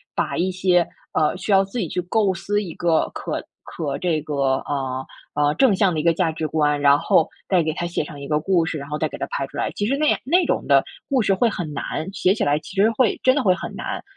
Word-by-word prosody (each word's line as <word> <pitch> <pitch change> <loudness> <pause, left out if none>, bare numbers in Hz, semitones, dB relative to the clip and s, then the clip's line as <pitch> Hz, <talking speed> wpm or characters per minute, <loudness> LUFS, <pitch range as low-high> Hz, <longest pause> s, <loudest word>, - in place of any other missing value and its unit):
把 - - -1
一 185 +2 +1
些， 180 -2 +2 0.3
呃， 155 +3 +2
需 210 - -3
要 195 0 +6
自 195 +5 -7
己 180 - -1
去 180 - -2
构 190 +2 +1
思 205 +4 -1
一 170 -5 -7
个 165 -2 +1
可 - - -4 0.2
可 145 -4 -4
这 170 -4 0
个 150 0 -6 0.3
呃， 130 -2 -3 0.3
呃 145 0 +2
正 255 -2 +4
向 190 -2 +2
的 155 - -1
一 - - -2
个 170 -1 +3
价 165 -2 +1
值 160 -1 -3
观， 150 -1 +1
然 140 0 +6
后 160 - +2 0.2
再 185 -3 +3
给 155 -1 -1
它 175 - -3
写 170 -2 -2
上 145 -1 -9
一 140 - -7
个 150 0 +1
故 170 +1 +2
事， 160 -2 -3
然 140 - -8
后 150 - -2
再 155 - 0
给 - - -9
它 - - -3
拍 135 - -3
出 - - -15
来？ - - -1
其 205 - -1
实 270 +5 +1
那 305 0 +2
样 - - +2
那 350 +8 +3
种 - - 0
的 - - +4 0.2
故 265 -4 +2
事 195 -2 +2
会 235 +5 +2
很 175 -8 -3
难， 160 +5 -4
写 190 -1 +2
起 - - -2
来 145 +1 +2
其 - - -10
实 200 +3 +4
会 230 -1 +1
真 260 +1 +4
的 285 - +1
会 185 - +4
很 - - -6
难。 - - -5
175 Hz, 290 characters per minute, -22 LUFS, 150-195 Hz, 0.3 s, 要